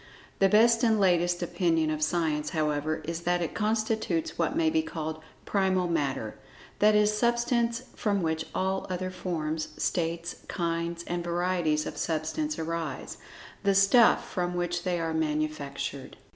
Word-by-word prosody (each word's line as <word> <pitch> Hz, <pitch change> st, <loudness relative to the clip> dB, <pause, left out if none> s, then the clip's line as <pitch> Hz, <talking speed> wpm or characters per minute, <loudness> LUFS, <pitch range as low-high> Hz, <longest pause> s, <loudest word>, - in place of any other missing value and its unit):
The 195 Hz, -, +5 dB
best 230 Hz, +2 st, +5 dB
and 220 Hz, -2 st, +4 dB
latest 175 Hz, -2 st, +2 dB
opinion 165 Hz, -3 st, +1 dB
of 155 Hz, 0 st, -3 dB
Science, 155 Hz, -2 st, 0 dB
however, 155 Hz, -1 st, -1 dB
is 165 Hz, +1 st, -4 dB
that 175 Hz, +1 st, +1 dB
it 165 Hz, -, -4 dB
constitutes 220 Hz, +8 st, 0 dB
what -, -, 0 dB
may 320 Hz, -1 st, +3 dB
be 320 Hz, 0 st, +2 dB
called 160 Hz, -, -5 dB, 0.2 s
"Primal 190 Hz, -2 st, +1 dB
Matter"—that 150 Hz, -, -1 dB
is 210 Hz, 0 st, +3 dB
substance 235 Hz, +1 st, +1 dB
from 200 Hz, -4 st, 0 dB
which 160 Hz, 0 st, -1 dB
all 190 Hz, 0 st, -1 dB
other 185 Hz, 0 st, -3 dB
forms, 160 Hz, -4 st, -3 dB
states, 170 Hz, 0 st, -2 dB
kinds 170 Hz, -1 st, -2 dB
and 175 Hz, 0 st, -3 dB
varieties 175 Hz, -3 st, 0 dB
of -, -, -6 dB
Substance 165 Hz, -, -2 dB
arise—the 165 Hz, +4 st, -4 dB
"stuff" 195 Hz, +5 st, +5 dB
from 180 Hz, -1 st, -2 dB
which 175 Hz, 0 st, -1 dB
they 180 Hz, -2 st, -1 dB
are 165 Hz, -1 st, -2 dB
manufactured. 150 Hz, -3 st, -3 dB
175 Hz, 140 wpm, -28 LUFS, 160-200 Hz, 0.2 s, The